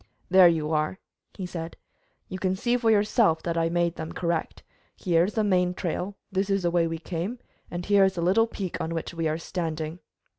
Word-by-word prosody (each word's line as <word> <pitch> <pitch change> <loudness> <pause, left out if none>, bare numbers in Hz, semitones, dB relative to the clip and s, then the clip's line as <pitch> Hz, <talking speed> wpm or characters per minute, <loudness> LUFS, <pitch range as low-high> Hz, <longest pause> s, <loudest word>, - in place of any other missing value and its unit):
"There 185 -1 +8
you 160 -2 +1
are," 155 +4 0 0.4
he 190 - -5
said. 165 -2 -6 0.5
"You 185 - -6
can 185 0 0
see 240 +5 +1
for 235 -2 +2
yourself 210 -5 +3
that 170 -1 -2
I 165 0 +2
have 165 - -1
made 175 0 0
them 160 - -5
correct. 170 -2 -2 0.3
Here 170 -2 +2
is 200 - -4
the 220 - +2
main 180 -3 +2
trail, 180 +3 -3 0.2
this 195 +1 0
is 195 -1 +1
the 175 - +1
way 170 -1 +2
we 165 0 -3
came, 175 +7 -4 0.3
and 175 0 -5
here 200 -1 +5
is 190 - 0
the 170 - -2
little 200 +6 +4
peak 195 -5 -5
on 165 +1 -3
which 165 - -4
we 165 -1 -1
are 155 0 0
standing. 165 -1 -4
175 Hz, 220 wpm, -26 LUFS, 165-195 Hz, 0.5 s, There